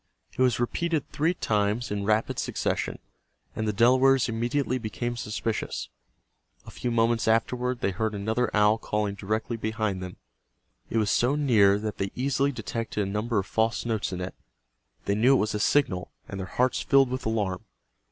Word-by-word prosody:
It - - -13
was 125 -2 +3
repeated 160 +5 -1
three 165 +4 +1
times 105 -1 0
in 100 -1 -2
rapid 110 +1 +1
succession, - - -2 0.6
and 110 - -2
the - - +2
Delawares 130 +4 +4
immediately 125 +3 -1
became 120 +2 -3
suspicious. 110 -1 -3 0.8
A - - -10
few 125 - -3
moments 115 -1 +2
afterward 125 +2 +1
they 100 - +1
heard 110 +3 -2
another 110 +4 0
owl 105 +1 +3
calling 105 -2 -1
directly 110 +4 -2
behind 110 -3 -2
them. 90 -1 -7 0.7
It 115 - -1
was 105 -2 +2
so 125 +4 +2
near 110 -9 +4
that 105 0 -5
they 95 0 -1
easily 140 +2 +1
detected 115 -3 -3
a - - -4
number 110 +2 -1
of 95 - +1
false 110 +2 0
notes 110 -4 -1
in 90 -1 -4
it. 90 - -4 0.7
They 100 - +1
knew 120 +6 +4
it - - +3
was 110 - -4
a 105 - -1
signal, 100 -7 +1 0.2
and 100 - -6
their 95 - -4
hearts 125 +5 +1
filled 135 -2 +4
with 130 -3 -3
alarm. 100 -5 -1
110 Hz, 175 wpm, -27 LUFS, 105-125 Hz, 0.8 s, Delawares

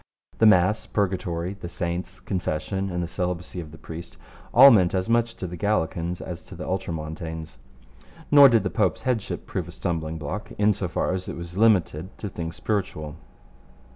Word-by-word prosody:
The 110 - +7
Mass, 105 +2 +4
Purgatory, 90 -3 -1
the 95 -3 -8
Saints, 90 +2 -4
Confession, 95 0 -2
and 90 -1 -2
the - - -3
celibacy 90 0 -3
of 80 -3 -7
the 80 - -12
priest, 85 +1 -9 0.3
all 135 +3 +10
meant 95 -6 +4
as 95 0 0
much 115 0 +2
to - - -5
the 90 0 -5
Gallican 85 -3 0
as 90 -2 -6
to - - -11
the - - -7
Ultramontane. 80 -3 -4 0.9
Nor 140 -2 +10
did 115 -3 +3
the - - -2
Pope's - - 0
headship 125 -5 -2
prove - - -4
a - - -8
stumbling 80 -2 -3
block 80 +8 -5
in 105 +1 +4
so 95 -1 -3
far 85 - -1
as 95 0 -4
it - - -5
was 85 +1 -8
limited 95 -5 +2
to 105 - -5
things 85 -2 -5
spiritual. 85 -8 -3
90 Hz, 180 wpm, -25 LUFS, 85-100 Hz, 0.9 s, all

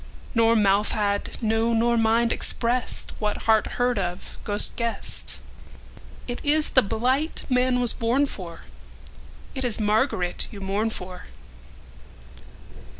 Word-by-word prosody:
Nor 230 -1 +3
mouth 205 -1 +2
had, 205 -1 -1
no 225 +1 +1
nor 235 +1 +2
mind, 230 +1 +2
expressedWhat 235 -3 -1
heart 220 -1 +3
heard 245 -2 +1
of, 180 -2 -5
ghost 205 0 +4
guessed:It 235 +1 -6
ís 300 +1 +1
the 260 - +7
blight 255 +8 -1
man 250 0 +2
was 245 -2 +3
born 245 +5 +1
for, 175 -10 -8 0.9
It 265 - -4
is 240 -3 +1
Margaret 210 -4 0
you 205 - -10
mourn 200 +3 -1
for. 180 -4 -8
225 Hz, 115 wpm, -24 LUFS, 205-245 Hz, 0.9 s, the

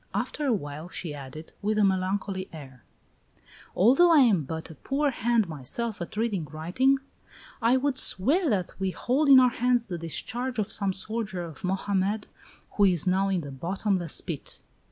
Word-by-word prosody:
After 295 - -2
a - - +3
while 150 -3 -5
she 170 -4 -5
added, 145 +2 -9
with 215 +1 0
a 210 - +4
melancholy 190 0 0
air: 135 -6 -11 0.9
"Although 270 - +5
I 310 -3 +7
am 200 - +3
but 160 +3 -6
a - - -9
poor 275 - -1
hand 235 -3 +1
myself 175 - -4
at 175 +4 -6
reading 210 -7 -1
writing, 175 - +1 0.6
I 235 +3 +4
would 265 0 0
swear 300 - +2
that 190 -6 0
we 190 0 0
hold 270 +9 0
in 270 -1 +10
our 250 -1 +5
hands 245 -1 +1
the 175 -5 -5
discharge 240 +10 -3
of 210 -2 -1
some 200 -2 0
soldier 205 -1 -3
of 160 -4 -10
Mohammed 195 +2 -1 0.5
who 205 - +3
is 180 -5 +3
now 190 +2 +2
in 185 -3 0
the 145 -2 -8
bottomless 175 +4 -2
pit." 165 -6 -6
195 Hz, 175 wpm, -27 LUFS, 170-235 Hz, 0.9 s, in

